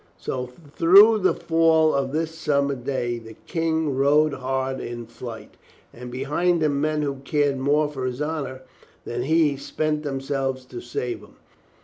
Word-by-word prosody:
So 125 -1 -4 0.3
through 205 +6 +7
the 185 - +2
fall 160 -1 +3
of 135 -1 0
that 160 +1 0
summer 145 -3 0
day 120 -2 -3
the 110 -1 -12
King 160 -3 -1
rode 145 +3 +3
hard 130 0 -2
in 120 0 -6
flight, 115 -2 -10 0.4
and 125 +1 -9
behind 155 +7 0
him 140 -2 +1
men 155 0 0
who 140 -1 -2
cared 140 0 0
more 145 +3 +2
for 135 -3 -4
his 125 +1 -4
honor 145 -4 -3 0.4
than 120 +1 -3
he, 150 +1 +2
spent 150 +2 -2
themselves 135 -2 -3
to 125 -1 -8
save 120 0 -4
him. - - -17
140 Hz, 155 wpm, -24 LUFS, 130-155 Hz, 0.4 s, through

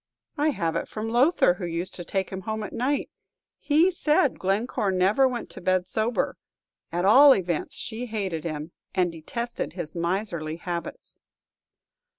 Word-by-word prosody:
"I 295 +2 +2
have 165 - -1
it - - -2
from 220 +1 -4
Lowther, 245 - +4
who 180 0 -6
used 170 +2 -3
to 175 - -6
take 190 +2 -2
him 190 0 -5
home 220 +2 -3
at 210 - -7
night; 275 +4 -1 0.5
he 320 +5 +3
said 300 -5 +2
Glencore 200 +2 0
never 195 +8 +3
went 245 -2 -4
to - - -9
bed 185 0 +1
sober! 220 +5 -1 0.5
At 175 +2 0
all 270 +7 +8
events, 175 -4 -2
she 240 +2 -5
hated 195 -8 -3
him, 155 0 -5 0.2
and 180 -2 +2
detested 235 +9 -4
his 170 -4 -6
miserly 170 -2 -2
habits." 170 0 -6
195 Hz, 160 wpm, -26 LUFS, 175-240 Hz, 0.5 s, all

